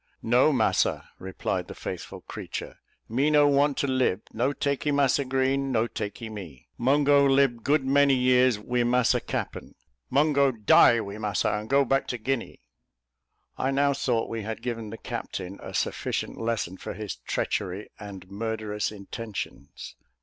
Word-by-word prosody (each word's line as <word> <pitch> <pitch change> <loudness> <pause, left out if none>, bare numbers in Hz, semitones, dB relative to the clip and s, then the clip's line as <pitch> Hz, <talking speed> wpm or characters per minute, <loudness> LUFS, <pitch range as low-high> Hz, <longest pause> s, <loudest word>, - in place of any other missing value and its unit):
"No, 125 +6 +4
massa," 120 -6 +1
replied 95 0 -3
the - - -9
faithful - - -7
creature; - - -7 0.3
"me 135 +6 +1
no 150 -1 +5
want 140 0 +3
to 140 - 0
lib: 130 -7 +1
no 125 +5 +1
takee 140 +1 -1
Massa 140 0 +3
Green, 135 +1 0
no 115 -2 +2
takee 115 0 -5
me! 95 - -9
Mungo 140 +3 +4
lib 135 -4 +3
good 145 -1 +2
many 140 0 +4
years 125 -2 +4
wi 120 +3 -1
massa 120 0 +3
cappen. - - -5 0.3
Mungo 140 -1 +3
die 110 +1 +6
wi 105 -2 -5
massa, 105 -1 0
and 105 +1 -3
go 140 +1 +4
back 135 +2 +1
to 125 - -3
Guinea!" 120 - -3 1.0
I 130 - +1
now 140 +1 +2
thought 120 -4 0
we 115 -1 -4
had 110 +1 -6
given 115 -3 -4
the 115 - -7
captain 95 -2 -6
a - - -8
sufficient - - -2
lesson 115 -5 -2
for - - -7
his 105 0 -5
treachery 95 +4 -3
and 100 -3 -9
murderous 105 +1 -3
intentions. 100 -7 -7
120 Hz, 155 wpm, -26 LUFS, 105-135 Hz, 1.0 s, die